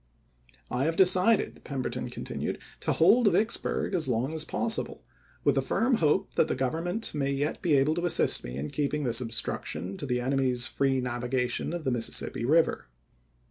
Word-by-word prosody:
"I 125 +3 0
have 165 +1 0
decided," 185 +4 +4
Pemberton 135 -3 -4
continued, - - -4
" - - -24
to - - 0
hold 205 +6 +5
Vicksburg 220 -1 0
as 170 -4 0
long 130 +7 0
as 160 -1 -3
possible, 225 +7 -2 0.4
with - - +4
the - - +1
firm 245 +1 +1
hope 170 +4 +1
that - - +2
the - - -1
Govern 135 +6 -2
ment 215 +6 -2
may 140 -2 -1
yet 145 +2 -2
be 165 -5 +3
able 140 +3 +3
to 175 +2 -2
assist - - +1
me 60 +1 -6
in 70 +2 -4
keeping 150 0 -1
this 120 -1 0
obstruction 115 -4 -3
to 145 - -5
the 125 -1 0
enemy's 130 -1 0
free 135 -1 0
navigation 125 0 -2
of 170 -1 -4
the 130 - 0
voi.xxiv., - - +1
Mississippi 115 0 -2
River. 160 - +2
140 Hz, 185 wpm, -28 LUFS, 125-175 Hz, 0.4 s, hold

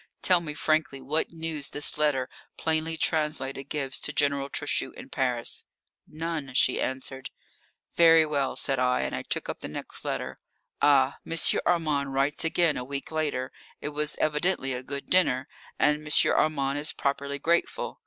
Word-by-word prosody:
Tell 180 -2 +5
me 150 -3 -6
frankly 155 -3 0
what 145 +5 -1
news 160 -3 -3
this 145 - +1
letter, 145 -4 +1 0.3
plainly 160 0 -1
translated, 150 -4 0
gives 135 -3 -2
to - - -1
General 140 -1 0
Trochu - - -1
in - - -11
Paris." 125 -3 -1 0.4
"None," 155 -4 -5
she - - +3
answered. 130 0 -4 0.6
"Very 165 -1 +6
well," 140 -3 -1
said 135 -2 0
I, 125 0 +2
and - - -3
I - - -3
took - - -3
up - - -5
the - - -6
next - - -6
letter. - - -4 0.4
Ah, 140 -2 +4
M. 165 - -4 0.3
Armand 150 -6 +1
writes 140 +2 +1
again 165 -1 +2
a 125 - -3
week 140 +3 -5
later. 150 -5 -2 0.3
It - - -4
was 150 0 -1
evidently 150 -2 0
a 125 - -4
good 140 +2 -5
dinner, 145 -7 +2 0.3
and 150 +1 +2
M. 155 - +6
Armand 140 -2 +1
is 150 +2 0
properly 140 0 -2
grateful. 170 +4 -1
145 Hz, 165 wpm, -27 LUFS, 135-155 Hz, 0.6 s, Very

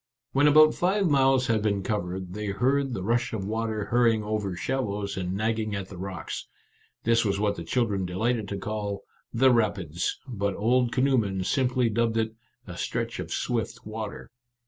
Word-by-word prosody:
When 145 +2 +4
about 155 +1 +7
five 190 +2 +1
miles 135 -2 +4
had 115 -3 +1
been 100 -2 0
covered, 95 -3 -3
they 105 +1 -4
heard 130 +7 +1
the 95 - -4
rush 120 +4 0
of 100 -3 -3
water 110 0 -2
hurrying 115 -1 +3
over 105 -3 -2
shallows 105 -3 -2
and 90 -1 -2
nagging 110 0 -1
at 100 -1 -5
the 95 - -9
rocks. 95 -3 -5 0.6
This 115 +1 +3
was 100 -2 0
what 105 -1 +1
the 85 - -6
chil 120 +9 +1
dren 100 -4 -2
delighted 110 +4 0
to 100 - -4
call 100 0 -4
" - - -40
The 130 -1 +7
Rapids," 100 -8 0
but 100 -5 -2
old 120 +3 +2
canoemen 120 -8 +1
simply 125 +3 +1
dubbed 115 0 +1
it 110 0 0 0.2
" - - -43
a - - -8
stretch - - -3
of - - -5
swift 115 -1 -2
water." 110 -1 -6
110 Hz, 185 wpm, -27 LUFS, 100-120 Hz, 0.6 s, about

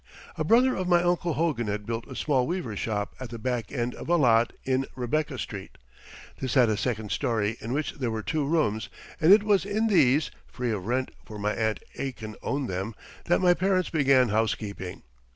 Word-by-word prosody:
A - - -1
brother 250 +3 +4
of 185 - -2
my 175 -1 +4
Uncle 175 -1 +1
Hogan 150 -9 0
had 105 0 -3
built 115 +1 -4
a 130 - -9
small 130 -4 +1
weaver's 160 - -3
shop 105 -2 -2
at 130 -2 -6
the 115 - -6
back 120 -2 -2
end 125 -2 -2
of - - -8
a 175 - +5
lot 120 -6 +4
in 130 0 0
Rebecca 140 +3 -1
Street. 100 -5 -7 0.6
This 130 0 -2
had 125 -4 +5
a 110 - +2
second 110 -1 -2
story 110 -2 0
in 115 - -5
which 145 +3 -1
there 130 -4 -2
were 110 -1 -3
two 155 -2 -1
rooms, 140 -9 0 0.3
and 165 +2 +5
it 205 +1 +8
was 205 -2 +3
in 205 +3 0
these 150 -6 +4 0.2
(free 125 -2 -3
of 100 -2 -3
rent, 130 +2 0
for 105 - -9
my 105 +1 -1
Aunt 110 -1 -1 0.2
Aitken 115 -5 -5
owned 140 -2 -2
them) 95 +4 -4 0.3
that 175 - +2
my 180 -1 +6
parents 185 0 +1
began 135 -5 +4
housekeeping. 105 -3 -2
125 Hz, 205 wpm, -27 LUFS, 110-160 Hz, 0.6 s, it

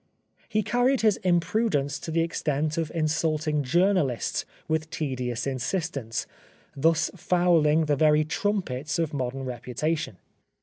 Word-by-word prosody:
He 215 0 +1
carried 245 +5 +2
his 215 -3 +3
imprudence 175 -5 +1
to - - -7
the 165 +1 +1
extent 155 -2 -1
of 165 -3 -1
in 160 -2 0
sulting 155 -1 0
journalists 155 - +1 0.2
with 160 0 -1
tedious 125 -6 -3
insistence, 135 - -2 0.5
thus 160 +3 +2
fouling 165 -3 +3
the 150 -1 +2
very 150 +1 +4
trumpets 155 -6 -1
of 165 -2 -1
modern 135 -1 -3
reputation. 130 - -3
155 Hz, 125 wpm, -26 LUFS, 140-175 Hz, 0.5 s, very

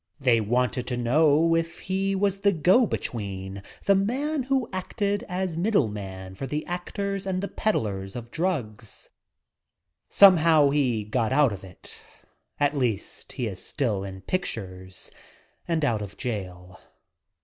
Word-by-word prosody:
They 125 -4 +3
wanted 125 +3 0
to 125 - -2
know 150 +6 +4
if 165 0 -2
he 195 +1 -1
was 200 0 +1
the 200 0 +4
go 185 - +4
between 100 - -4
— - - -24
the 200 - +5
man 265 +10 0
who 260 -2 0
acted 200 +2 -1
as 180 -2 -2
middleman 105 - -1
for 135 +8 -5
the 150 +3 -3
actors 195 +2 -3
and 185 -1 0
the 200 - -2
ped - - -22
DOPE! - - -7
15 - - +2
dlars 95 -2 -5
of 120 -1 -7
drugs. 130 - -3 1.0
Somehow 165 -7 +6
he 125 -7 +1
got 110 +2 -1
out 135 -4 +4
of 100 - -9
it. 90 -2 -11 0.6
At 145 0 +2
least, 120 -7 -2
he 125 - -2
is 95 -5 -5
still 110 -8 -1
in 95 -1 -7
pictures 95 - -4 0.6
and 165 -3 +1
out 115 -6 +1
of 105 0 -8
jail. 90 -7 -5
140 Hz, 155 wpm, -26 LUFS, -, 1.0 s, Somehow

